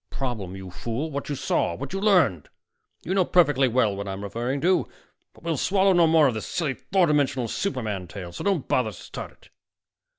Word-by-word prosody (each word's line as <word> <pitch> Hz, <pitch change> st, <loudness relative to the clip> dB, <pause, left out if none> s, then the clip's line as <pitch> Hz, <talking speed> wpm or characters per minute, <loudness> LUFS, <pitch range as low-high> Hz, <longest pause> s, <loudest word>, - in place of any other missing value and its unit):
The -, -, -14 dB
problem, 110 Hz, -9 st, -3 dB
you 95 Hz, -1 st, -8 dB
fool, 120 Hz, -, -4 dB
what 140 Hz, +1 st, -4 dB
you 145 Hz, -, -1 dB
saw, 85 Hz, -, 0 dB
what 140 Hz, -, -7 dB
you 195 Hz, -, -2 dB
learned; 160 Hz, -, +3 dB, 0.5 s
you 185 Hz, -, -2 dB
know 190 Hz, -1 st, +4 dB
perfectly 145 Hz, -7 st, +3 dB
well 115 Hz, -4 st, +2 dB
what 100 Hz, 0 st, -5 dB
I'm 95 Hz, +1 st, -5 dB
referring 120 Hz, +7 st, -2 dB
to. 185 Hz, +2 st, +2 dB, 0.4 s
But -, -, -21 dB
we'll 165 Hz, -2 st, -1 dB
swallow 195 Hz, +5 st, +3 dB
no 170 Hz, -2 st, +5 dB
more 160 Hz, -1 st, +5 dB
of 125 Hz, -, 0 dB
this 110 Hz, -, -5 dB
silly 165 Hz, -6 st, -1 dB
four 180 Hz, -, +1 dB
dimensional 140 Hz, -5 st, +1 dB
superman 110 Hz, -, -3 dB
tale, 90 Hz, -2 st, -8 dB
so 85 Hz, -, -7 dB
don't 195 Hz, -8 st, 0 dB
bother 125 Hz, -4 st, +1 dB
to 100 Hz, -, -10 dB
start -, -, -8 dB
it." -, -, -23 dB
135 Hz, 210 wpm, -25 LUFS, 105-170 Hz, 0.5 s, no